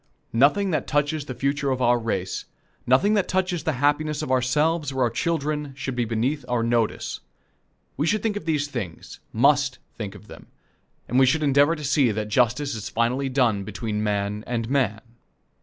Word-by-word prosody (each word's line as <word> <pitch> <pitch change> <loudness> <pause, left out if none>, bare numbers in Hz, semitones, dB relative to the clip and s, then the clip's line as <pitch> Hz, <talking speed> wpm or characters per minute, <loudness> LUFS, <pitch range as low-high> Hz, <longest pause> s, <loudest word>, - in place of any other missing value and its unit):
Nothing 150 - +3
that 155 -5 -1
touches 145 0 0
the 130 - -6
future 140 +1 0
of 130 -1 0
our 120 -1 +3
race, 95 -5 -3 0.4
nothing 135 - +4
that 205 -3 +2
touches 185 -4 -1
the 160 - +1
happiness 145 +2 +1
of - - -3
ourselves 150 +4 +1
or 130 -1 0
our 120 - +1
children, 150 0 -2
should 135 -1 -4
be 120 -1 0
beneath 120 +6 -1
our 120 -2 +1
notice. 115 -1 0 0.8
We 150 - 0
should 210 +3 +1
think 220 -2 0
of 205 - -5
these 150 -3 0
things 110 - -7
must 140 +2 +3 0.2
think 105 -4 -6
of - - -13
them - - -13 0.6
and 125 - +2
we 130 - +6
should 155 +4 +2
endeavor 145 +3 +4
to 150 - -8
see 140 -2 +3
that 105 0 -3
justice 125 +5 +1
is 110 -2 -5
finally 125 +4 0
done 120 -7 +1
between 105 +1 -3
man 105 0 -1
and 115 -2 -2
man. 110 -6 +1
135 Hz, 185 wpm, -24 LUFS, 115-150 Hz, 0.8 s, we